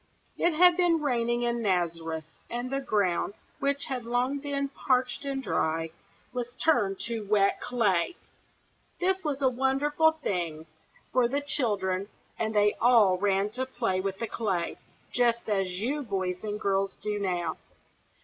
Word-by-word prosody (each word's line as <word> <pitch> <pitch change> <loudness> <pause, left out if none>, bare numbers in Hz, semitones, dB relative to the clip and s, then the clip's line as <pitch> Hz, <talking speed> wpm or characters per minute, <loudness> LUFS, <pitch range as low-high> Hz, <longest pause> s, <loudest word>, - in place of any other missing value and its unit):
It 345 -2 +1
had 355 +1 +6
been 350 -2 +3
raining 240 -4 0
in 235 0 0
Nazareth, 165 -5 -1 0.3
and 240 +2 -4
the 275 - 0
ground, 205 -6 0 0.2
which 280 0 0
had 255 -3 -3
long 245 +4 0
been 280 -1 -2
parched 255 0 0
and 270 -1 -2
dry, 165 -6 0 0.4
was 245 -1 -4
turned 210 -12 +2
to 230 -2 -3
wet 200 -1 +3
clay. 220 - +1 0.8
This 380 +1 +1
was 285 -3 -2
a - - +6
wonderful 275 +5 +2
thing 175 - -3 0.5
for 250 -1 +4
the 275 +4 0
children, 200 -9 -1 0.3
and 220 -1 -1
they 210 0 +4
all 220 -6 +5
ran 200 +1 +1
to 255 +3 -3
play 185 -7 -1
with 195 0 -3
the 230 - -2
clay, 195 -7 -2 0.3
just 235 -1 +2
as 190 -3 0
you 275 +8 -1
boys 190 -6 -2
and 210 -1 -3
girls 195 -1 0
do 210 0 -3
now. 175 -4 -1
230 Hz, 150 wpm, -28 LUFS, 195-270 Hz, 0.8 s, had